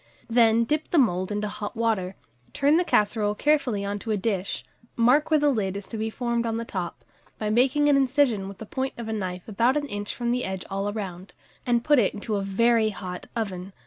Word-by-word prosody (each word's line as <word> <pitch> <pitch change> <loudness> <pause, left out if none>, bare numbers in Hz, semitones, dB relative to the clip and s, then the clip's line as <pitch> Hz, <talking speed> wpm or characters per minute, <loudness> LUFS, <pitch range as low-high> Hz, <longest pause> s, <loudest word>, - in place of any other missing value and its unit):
Then 230 -1 +5
dip 300 +6 -1
the 345 - +1
mould 185 - +2
into 210 +1 -1
hot 205 +2 -6
water, 210 -5 0 0.4
turn 290 +3 +3
the 355 - +3
casserole 210 -7 +1
carefully 255 -8 +1
on 200 +1 -3
to 225 - -8
a 215 - +1
dish, 195 -2 -2 0.3
mark 250 +6 +4
where 310 -1 +4
the 290 0 +3
lid 200 -6 -1
is 200 - -7
to - - -6
be 220 +1 -1
formed 235 0 -1
on 225 0 -1
the 230 - -3
top, 180 -5 -5 0.3
by 215 -1 -2
making 270 +6 +3
an 290 - +5
incision 260 -7 +2
with 195 -1 -9
the 220 - -8
point 265 +5 -3
of 235 -2 -6
a 220 - -2
knife 185 -4 -4
about 230 +6 +2
an 290 - -1
inch 205 -4 -5
from 240 -1 -1
the 250 +1 0
edge 190 -1 -4
all 195 +1 -1
round, 190 -3 -6 0.3
and 240 -1 +2
put 295 -1 +4
it 215 - +1
into 210 +1 -2
a - - -1
very 220 +3 +2
hot 180 -3 -7
oven. 195 -4 -4
220 Hz, 225 wpm, -25 LUFS, 200-245 Hz, 0.4 s, Then